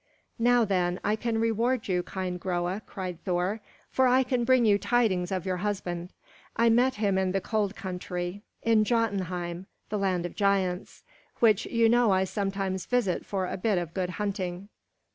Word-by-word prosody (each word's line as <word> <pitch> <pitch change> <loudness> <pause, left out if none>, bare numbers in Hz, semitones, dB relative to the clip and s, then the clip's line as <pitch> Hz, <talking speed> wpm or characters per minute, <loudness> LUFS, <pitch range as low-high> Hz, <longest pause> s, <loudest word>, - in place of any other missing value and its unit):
"Now, 240 0 +4
then, 180 -2 0
I 210 - +2
can 225 0 -1
reward 230 +2 +1
you, 180 -2 +1
kind 180 0 -4
Groa!" 180 +2 -2
cried 180 -3 -6
Thor, 185 +4 -1 0.3
"for 260 -1 +3
I 255 +1 +4
can 250 -1 0
bring 255 -1 +4
you 205 -2 +4
tidings 200 -8 +1
of 185 -2 -2
your 185 -1 -1
husband. 180 -3 -3 0.4
I 230 +1 +4
met 245 +3 +3
him 200 -3 +1
in 185 -1 0
the 195 - +2
cold 210 0 -1
country, 180 0 -5 0.2
in 225 -2 +4
Jotunheim, 190 -6 -1 0.2
the 210 - -1
Land 185 -3 0
of 175 - -6
Giants, 195 -3 0 0.3
which 220 -4 +3
you 230 -1 +3
know 240 0 +4
I 190 -1 +3
sometimes 195 -1 -2
visit 240 -8 0
for 190 -2 -1
a - - -4
bit 200 +1 +1
of 170 -2 -3
good 185 -2 -1
hunting. 195 -2 -3
195 Hz, 175 wpm, -28 LUFS, 180-225 Hz, 0.4 s, Now